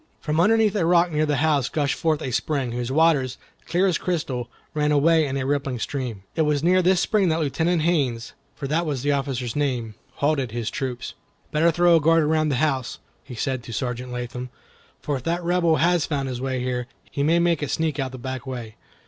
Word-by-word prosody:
From 155 0 -1
underneath 215 +2 +4
a 195 - +1
rock 170 +1 +3
near 155 0 +1
the 150 - +1
house 145 -5 +2
gushed 145 -3 0
forth 160 -3 0
a 130 - -3
spring, 135 -1 -1
whose 120 +1 -3
waters, 145 -4 +2 0.3
clear 180 +3 +2
as 185 -3 +1
crystal, 130 -9 -2 0.2
ran 150 0 +1
away 155 +1 +4
in 135 0 -2
a 135 - -2
rippling 140 -2 -1
stream. 120 -5 -4
It - - +1
was 150 -2 +1
near 185 +2 +4
this 185 0 +3
spring 195 -1 +2
that 160 +1 +1
Lieutenant 160 +2 0
Haines, 135 -9 0 0.2
for 145 - -6
that 165 +4 0
was 140 -4 -2
the 145 - +2
officer's 135 -4 -2
name, 125 -6 -1 0.2
halted 140 -5 0
his 120 -2 -3
troops. 125 -2 -4 0.4
"Better 160 +3 +3
throw 175 +1 +4
a - - 0
guard 165 +1 +4
around 155 0 +2
the 140 - +1
house," 135 -3 0 0.3
he 125 - -9
said 130 +2 -2
to 120 - -10
Sergeant 125 +1 -3
Latham, 125 0 -5 0.5
"for 145 -2 -1
if 130 - -9
that 170 +1 -1
Rebel 170 -2 +2
has 170 0 +2
found 140 -3 -2
his 125 -1 -4
way 130 -1 -2
here, 125 -1 -2 0.2
he 140 - -2
may 160 +4 +3
make 170 -2 +2
a 145 - -1
sneak 155 -1 -1
out 135 -1 -2
the 130 - -8
back 130 +1 -6
way. 120 -4 -6
145 Hz, 215 wpm, -24 LUFS, 130-165 Hz, 0.5 s, underneath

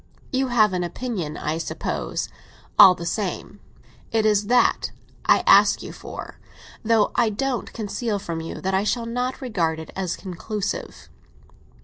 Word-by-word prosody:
"You 265 +1 +1
have 215 -5 +3
an 180 -1 0
opinion, 175 -4 -4
I 155 +2 -2
suppose, - - -3 0.5
all 190 -3 +10
the 170 - -7
same. 190 +1 -3 0.5
It 220 -1 +2
is 210 -1 +3
that 245 +2 +3 0.4
I - - +4
ask - - +6
you - - -7
for; - - -9 0.4
though 225 -1 +3
I 235 -2 +3
don't 250 +4 -2
conceal 220 0 -2
from 170 -4 -4
you 165 - -6
that 190 +1 -1
I 190 +1 +2
shall 230 +2 0
not 250 +3 -2
regard 175 -11 0
it 160 -1 -8
as 185 -3 -2
conclusive." 195 +2 -5
210 Hz, 150 wpm, -23 LUFS, 180-230 Hz, 0.5 s, all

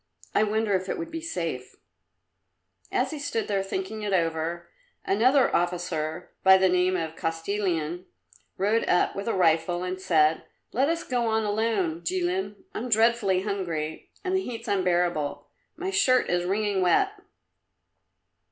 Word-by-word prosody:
I - - +3
wonder 215 0 +1
if 185 0 -1
it - - -1
would 330 -1 -5
be 325 0 -4
safe?" 165 - -4 1.2
As 255 +1 0
he 310 - -5
stood 230 -6 -2
there 200 -2 0
thinking 220 - -4
it 205 -1 -2
over, 165 0 -1 0.4
another 255 +7 +3
officer, 175 -1 -2
by 190 0 +7
the 190 0 +3
name 180 +1 +2
of 165 -2 -4
Kostilin, 170 0 -2 0.5
rode 210 +4 +2
up 180 - +2
with 200 +2 -5
a 230 - 0
rifle 175 0 +2
and 185 +1 -4
said, 160 -4 +3 0.3
"Let 270 +6 +2
us 335 0 -1
go 245 -2 -1
on 220 0 +1
alone, 205 -6 0
Jilin. 185 +3 -1 0.2
I'm 245 +3 -4
dreadfully 220 -4 +3
hungry, 170 -7 -3
and 375 0 0
the 380 - +2
heat's 235 -8 -6
unbearable. 175 -6 0 0.3
My 380 +1 -3
shirt 260 - +3
is 175 0 +1
wringing 200 +1 0
wet." 180 -2 +3
190 Hz, 150 wpm, -26 LUFS, 175-225 Hz, 1.2 s, by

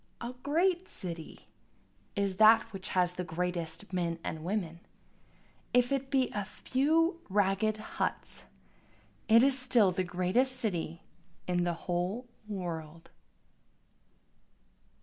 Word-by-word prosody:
A 240 +1 -5
great 350 +6 +1
city 170 -3 -7 0.7
is 200 -2 0
that 220 +2 +7
which 190 -1 -6
has 180 -1 +3
the 180 - -3
greatest 175 +1 -3
men 170 -2 0
and 155 -1 -4
women, 175 -3 -2 1.0
If 245 +1 +4
it 275 -1 -1
be 265 -2 +2
a 205 - -2
few 320 - +1
ragged 205 +2 +2
huts 215 - -3 0.8
it 230 +1 +7
is 275 -1 +4
still 240 -6 +4
the 185 +1 -1
greatest 185 +9 +1
city 170 -8 -2 0.4
in 175 -1 +1
the 175 - +1
whole 180 +7 -1 0.2
world. 165 -5 -6
195 Hz, 115 wpm, -31 LUFS, 175-250 Hz, 1.0 s, that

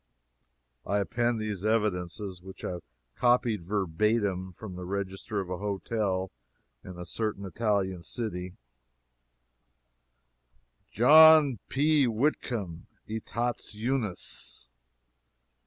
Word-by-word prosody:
I 100 +7 0
append 120 +3 0
these 105 -3 -4
evidences, 100 -3 -1
which 95 +1 -10
I 90 - -3 0.4
copied 120 -4 +2
verbatim 95 +1 0
from 95 +1 -9
the 90 - -6
register 95 +2 -3
of 95 -2 -4
a 90 - -3
hotel 100 -2 -2 0.5
in 90 -1 -9
a 90 - -6
certain 105 -2 -3
Italian 95 -2 -1
city: 90 -1 -5 2.3
"John 150 0 +7
P. 145 -1 +3
Whitcomb, 110 - -1 0.2
Etats 115 +1 -3
Unis. 110 - -3
105 Hz, 90 wpm, -29 LUFS, 95-115 Hz, 2.3 s, John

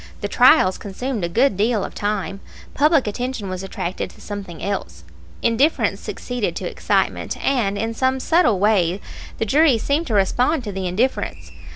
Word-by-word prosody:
The 205 - -1
trials 200 -5 +5
consumed 220 +2 -4
a 170 - -1
good 235 +5 +2
deal 215 +1 +1
of - - -6
time. 205 -1 -2 0.3
Public 300 0 +3
attention 225 -1 -3
was 185 0 -4
attracted 190 -1 -4
to - - -18
something 200 -5 -7
else. 85 - -4 0.4
Indifference 260 +8 +2
succeeded 245 -4 -3
to - - -4
excitement, - - -1
and 225 -7 0
in 225 +2 -2
some 260 +3 0
subtle 260 - +3
way 195 -3 +2 0.4
the - - -1
juries 275 0 +3
seemed 300 +4 0
to 225 - -1
respond 250 +9 +2
to 210 - -4
the 190 -1 -3
indifference. 225 +9 -2
215 Hz, 165 wpm, -21 LUFS, 195-260 Hz, 0.4 s, trials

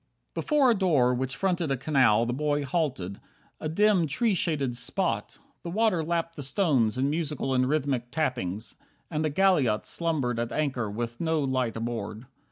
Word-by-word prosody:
8 - - -49
Before 290 -5 +3
a - - +5
door 155 - +3
which 130 0 -2
fronted 180 -3 0
a 135 - 0
canal 125 -5 +3
The 120 - -1
boy 145 +1 0
halted. 130 - -2 0.4
A 155 - -3
dim 195 0 +3
tree 215 - +1
shaded 145 -9 -1
spot. 120 - -2 0.2
The 170 - -6
water 200 -3 +2
lapped 165 0 -2
the 145 - -6
stones 135 - +1
in 135 +2 +1
musical 150 -3 -1
And 130 0 +2
rhythmic 135 -5 0
tappings, 120 - -2 0.4
and 155 -1 -1
a - - -1
galliot 145 - +2
Slumbered 145 -8 -1
at 120 0 -2
anchor 130 -7 -1
with 115 +4 -4
no 160 -1 +1
light 130 -4 -1
aboard. 115 0 -4
140 Hz, 175 wpm, -27 LUFS, 120-165 Hz, 0.4 s, a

